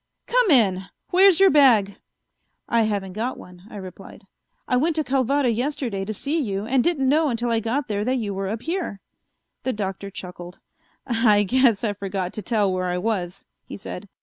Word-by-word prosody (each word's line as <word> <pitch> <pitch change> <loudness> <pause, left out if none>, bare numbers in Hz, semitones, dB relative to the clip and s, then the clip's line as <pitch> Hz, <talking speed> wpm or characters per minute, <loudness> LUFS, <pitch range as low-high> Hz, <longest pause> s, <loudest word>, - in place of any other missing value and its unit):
Come - - +2
in. 195 - +3 0.3
Where's 380 -1 +6
your 390 -1 +6
bag?" 230 -9 +4 0.7
"I 235 - +2
haven't 195 -3 -3 0.2
one," 180 +2 -14
I - - -11
replied. 190 -1 -10 0.4
"I 250 - +1
went 310 +6 +1
to 310 - +1
Calvada 270 0 +1
yesterday 240 -5 -2
to 215 - -4
see 295 +10 -1
you, 200 -5 -3
and 255 +1 +2
didn't 295 -6 +1
know 305 +3 +3
until 235 0 -1
I 230 - +2
got 245 +5 -2
there 205 -1 -2
that 255 +2 +1
you 215 -5 -3
were 195 0 -3
up 220 +3 -4
here." 330 - -3 0.6
The 260 - -2
Doctor 195 -1 -4
chuckled. 180 -1 -9 0.5
"I 225 -4 +3
guess 240 0 +2
I 210 -3 0
forgot 195 -2 -4
to 215 - -5
tell 205 -2 0
where 185 0 -2
I 180 0 -1
was," 185 -2 -3 0.2
he - - -9
said. 195 0 -8
220 Hz, 185 wpm, -23 LUFS, 195-265 Hz, 0.7 s, Where's